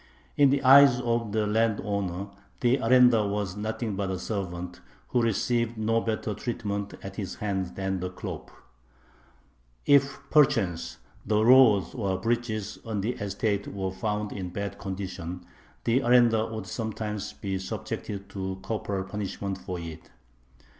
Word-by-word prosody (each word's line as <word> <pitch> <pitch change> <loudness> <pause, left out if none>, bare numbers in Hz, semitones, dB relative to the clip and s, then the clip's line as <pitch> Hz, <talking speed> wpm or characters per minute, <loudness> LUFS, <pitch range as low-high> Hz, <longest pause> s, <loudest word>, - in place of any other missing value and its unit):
In 140 -1 +6
the 140 +1 +1
eyes 135 -1 +8
of 115 -3 -1
the 110 0 +1
landowner 100 -3 0 0.3
the 125 +2 +4
arendar 125 -3 +5
was 100 -2 -2
nothing 110 0 -3
but 95 0 -2
a 95 - -2
servant, 90 -3 -5 0.3
who 125 - +2
received 115 +1 0
no 115 +1 +1
better 110 -1 -2
treatment 100 -3 -4
at 95 0 -8
his 95 -3 -4
hands 95 -3 -2
than 95 -1 -2
the 90 0 -3
khlop. 90 - -7 1.4
If 140 -1 +4
perchance 120 - +2 0.3
the 105 +1 +2
roads 115 -8 +6
or 100 -5 -1
bridges 110 -2 -2
on 110 -3 -3
the 110 +5 0
estate 100 -1 -2
were 95 -1 -3
found 105 +2 -2
in 95 -2 -5
bad 100 +2 -5
condition, 90 -2 -5 0.4
the 115 +3 +3
arendar 120 -3 +4
would 110 -2 -5
sometimes 105 +1 -4
be 95 -1 -3
subjected 100 +1 -5
to 95 -1 -4
corporal 100 -3 -2
punishment 100 -1 -4
for 90 -1 -5
it. 80 -1 -9
105 Hz, 140 wpm, -27 LUFS, 95-115 Hz, 1.4 s, eyes